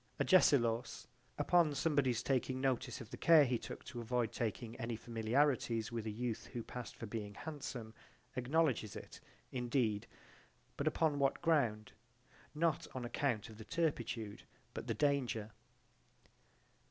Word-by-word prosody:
Agesilaus, 120 -10 +4 0.3
upon 155 0 +4
somebody's 135 -5 +2
taking 130 -1 0
notice 130 -2 0
of 115 - -10
the - - -6
care 160 -3 +7
he 125 -2 0
took - - -8
to 120 -2 -6
avoid 120 -1 0
taking 115 0 -3
any 115 0 -3
familiarities 115 0 +1
with 115 -2 -3
a - - 0
youth 115 +1 -3
who 120 -2 -3
passed 125 +1 -7
for - - -6
being 105 -2 -5
handsome 130 -7 -6 0.4
acknowledges 130 -4 +1
it, - - -9 0.3
indeed, 120 -4 0 0.7
but 140 - -2
upon 155 -2 +2
what 135 -1 +2
ground? 120 -11 +2 0.6
Not 160 -1 +1
on 125 -2 -3
account 120 -3 0
of 110 -1 -12
the - - -6
turpitude 120 - -2 0.3
but - - -6
the - - 0
danger. 130 -7 +1
125 Hz, 140 wpm, -36 LUFS, 115-145 Hz, 0.7 s, care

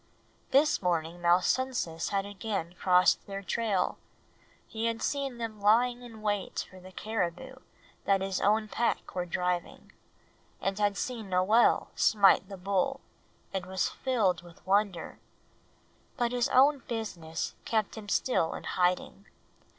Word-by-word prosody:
This 290 +3 +3
morning 170 -1 -1
Malsunsis 175 0 +1
had 195 -1 0
again 200 -4 -4
crossed 180 0 +3
their 195 0 -5
trail. 205 0 0 0.7
He 225 0 -4
had 230 0 -1
seen 275 -3 -2
them 225 -3 -5
lying 240 +4 +3
in 225 -3 -11
wait 205 -2 -1
for 185 - -14
the 185 +1 -13
caribou 220 +5 -3 0.5
that 195 0 +3
his 190 -1 -2
own 215 +2 +2
pack 235 +2 -1
were 180 -1 -2
driving; 180 0 -3 0.7
had 200 0 0
seen 230 -4 -4
Noel 190 +6 +3
smite 200 -2 +4
the 195 - -7
bull, 195 +8 0 0.5
and 185 -2 -3
was 190 0 0
filled 210 -9 0
with 175 -1 -17
wonder; 195 -2 0 1.0
but 240 -1 +1
his 245 -1 +1
own 275 +3 +5
business 175 -9 -4
kept 215 -3 -1
him 215 -2 -8
still 180 -7 +1
in - - -7
hiding. 180 +2 -1
200 Hz, 135 wpm, -29 LUFS, 180-230 Hz, 1.0 s, own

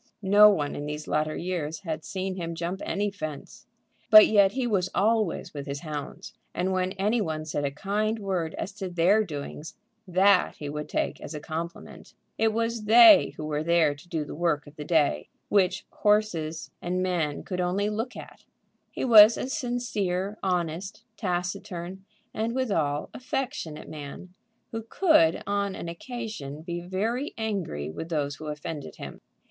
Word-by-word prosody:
No 205 +2 +8
one 150 -8 0
in 145 - -5
these 150 +1 -5
latter 155 0 0
years 165 -3 -3
had 160 -4 -4
seen 190 0 -3
him 170 -2 -4
jump 170 +3 -4
any 205 +1 -1
fence. 155 -7 -8 0.4
But 215 -1 +11
yet 200 -2 +4
he 260 -1 -1
was 190 -6 +1
always 215 -3 +1
with 140 -1 -6
his 140 0 -4
hounds, 150 -3 -7 0.2
and 185 +2 0
when 185 0 0
any 210 +4 +1
one 155 -4 -3
said 145 -2 -2
a - - +1
kind 210 +9 -1
word 185 -6 -2
as 200 - -4
to 190 -3 -4
their 180 +5 +3
doings, 150 -2 -7 0.3
that 185 +1 +4
he 145 - -6
would 150 +1 -5
take - - -2
as 155 - -7
a - - -4
compliment. 165 +3 -7 0.2
It 220 0 +3
was 230 0 -2
they 240 +9 +8
who 155 - -5
were 150 -1 -1
there 165 -3 +3
to 145 +5 -17
do 160 -3 -2
the - - -8
work 165 -2 0
of 145 0 -14
the 150 - -6
day, 145 - +1 0.2
which 190 -2 +2
horses 195 -7 0
and 180 +1 -1
men 170 -6 -1
could 180 -2 -3
only 185 +3 0
look 225 +4 -3
at. - - -11 0.5
He - - -4
was 220 -2 +9
a - - -3
sincere, 215 - -2
honest, 180 +2 -2
taciturn, 180 -1 -4 0.3
and 225 +2 -2
withal, 160 - -1
affectionate 255 - -4
man, 155 +4 -9 0.4
who 225 - -3
could 225 - +3
on 200 -1 -1
an - - -6
occasion 170 - -6
be 175 0 -4
very 220 - -2
angry 190 - -3
with 165 - -7
those 145 -3 -1
who 155 - -8
offended 150 0 -6
him. - - -9
180 Hz, 170 wpm, -27 LUFS, 155-210 Hz, 0.5 s, But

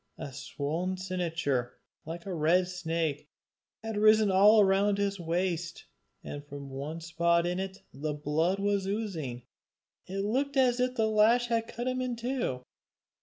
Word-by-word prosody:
A 140 - -7
swollen 155 +7 -3
cincture, 165 -9 -2 0.3
like 170 +1 -6
a 195 - -4
red 175 +3 +3
snake, 165 -4 -2 0.5
had 225 -1 -4
risen 215 -1 +5
all 205 +3 +7
round 200 +1 +3
his 200 -1 -1
waist, 170 0 -2 0.4
and 145 0 -7
from 140 -1 -9
one 145 +5 -5
spot 170 +1 +2
in 180 +1 -1
it 190 0 -5
the 150 +2 -3
blood 155 +5 0
was 200 -1 0
oozing. 170 - -3 0.6
It 195 +2 -3
looked 275 +6 0
as 250 -2 +4
if 250 0 +1
the 225 - +2
lash 225 +3 +4
had 230 -1 0
cut 240 +2 -5
him 255 0 -1
in 250 -1 -2
two. 235 - -2
185 Hz, 155 wpm, -30 LUFS, 160-215 Hz, 0.6 s, all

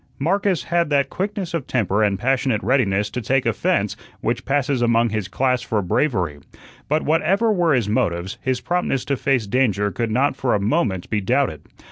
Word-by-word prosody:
Marcus 180 0 0
had 170 +3 0
that 140 -2 +1
quickness 195 -2 -3
of 165 -6 -3
temper 110 -4 0
and 100 -2 +1
passionate 130 -1 0
readiness 105 -6 +2
to 125 - -3
take 130 +4 +1
offence - - 0 0.2
which - - -2
passes 140 -2 0
among 115 0 +3
his 105 -3 -2
class 125 +5 0
for 115 -3 -1
bravery. 90 - 0 0.5
But 155 +2 +1
whatever 190 +9 +2
were 175 -7 +2
his 120 -5 0
motives, 90 -3 -1
his 130 -2 -1
promptness 175 -7 -1
to 140 - 0
face 135 -4 0
danger 105 -3 +1
could 115 +5 -2
not 130 +5 +1
for 130 -3 0
a - - +1
moment 100 - 0
be 105 -2 +1
doubted. 95 - 0
125 Hz, 180 wpm, -21 LUFS, 105-145 Hz, 0.5 s, among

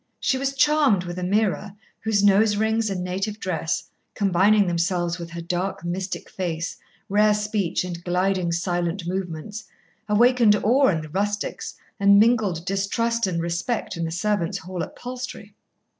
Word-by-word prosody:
She 260 - +1
was 275 0 -1
charmed 290 -9 +3
with 175 0 -5
Ameerah, 200 +1 0 0.2
whose 215 -2 +1
nose 205 +1 +5
rings 220 +1 +1
and 185 -2 -3
native 195 +4 -3
dress, 165 -5 -2 0.3
combining 200 +1 +4
themselves 175 0 0
with 170 -1 -6
her 170 0 -6
dark 180 +2 -3
mystic 185 +2 -4
face, 170 -2 -3 0.3
rare 210 +1 +4
speech, 210 -5 -1
and 175 -1 -6
gliding, 180 0 0
silent 175 +1 -1
movements, 185 +3 -4 0.4
awakened 235 0 +5
awe 250 +7 +3
in 165 -4 +1
the 155 - -9
rustics 205 +4 -3 0.2
and 200 0 +6
mingled 210 -7 +2
distrust 205 +4 0
and 170 -2 -1
respect 170 +8 -2
in 170 - -3
the 165 - -2
servants' 180 0 -1
hall 180 +1 -6
at 160 - -6
Palstrey. 245 -4 -7
195 Hz, 150 wpm, -24 LUFS, 175-215 Hz, 0.4 s, and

